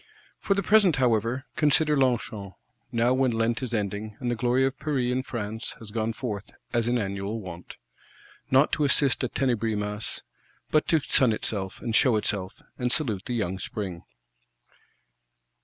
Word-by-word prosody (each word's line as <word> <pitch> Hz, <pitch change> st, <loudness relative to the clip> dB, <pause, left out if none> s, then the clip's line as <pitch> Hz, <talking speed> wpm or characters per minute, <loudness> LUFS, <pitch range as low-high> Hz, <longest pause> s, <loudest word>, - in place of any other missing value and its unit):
For 195 Hz, -, +1 dB
the 200 Hz, -, 0 dB
present, 205 Hz, -5 st, +5 dB
however, 120 Hz, +1 st, +1 dB
consider 150 Hz, 0 st, +3 dB
Longchamp; 115 Hz, -7 st, 0 dB, 0.4 s
now 120 Hz, +1 st, +2 dB
when 130 Hz, 0 st, +2 dB
Lent 115 Hz, +1 st, 0 dB
is 130 Hz, -3 st, -4 dB
ending, 105 Hz, 0 st, -3 dB
and 125 Hz, -2 st, -1 dB
the -, -, 0 dB
glory 125 Hz, +3 st, +2 dB
of 135 Hz, 0 st, -2 dB
Paris 135 Hz, -4 st, 0 dB
and 130 Hz, +1 st, 0 dB
France 110 Hz, -2 st, -4 dB
has 110 Hz, -2 st, -11 dB
gone 110 Hz, 0 st, -1 dB
forth, 110 Hz, -3 st, -5 dB, 0.2 s
as 120 Hz, -1 st, +1 dB
in 120 Hz, +1 st, +2 dB
annual 100 Hz, +1 st, -3 dB
wont. 90 Hz, -4 st, -9 dB, 0.7 s
Not 135 Hz, +3 st, +4 dB
to 150 Hz, -, +1 dB
assist 140 Hz, -2 st, +3 dB
at 130 Hz, -, -3 dB
Tenebris 115 Hz, -5 st, +1 dB
Masses, 105 Hz, +1 st, -3 dB, 0.5 s
but 155 Hz, -, +3 dB
to 160 Hz, -2 st, +3 dB
sun 130 Hz, -3 st, +4 dB
itself 100 Hz, -3 st, -3 dB
and 115 Hz, -2 st, -1 dB
show 125 Hz, -2 st, +5 dB
itself, 100 Hz, -3 st, -2 dB, 0.2 s
and 125 Hz, -1 st, 0 dB
salute 110 Hz, -12 st, 0 dB
the 125 Hz, -, -2 dB
Young 95 Hz, -4 st, -2 dB
Spring. 95 Hz, -4 st, -4 dB
115 Hz, 165 wpm, -26 LUFS, 105-130 Hz, 0.7 s, present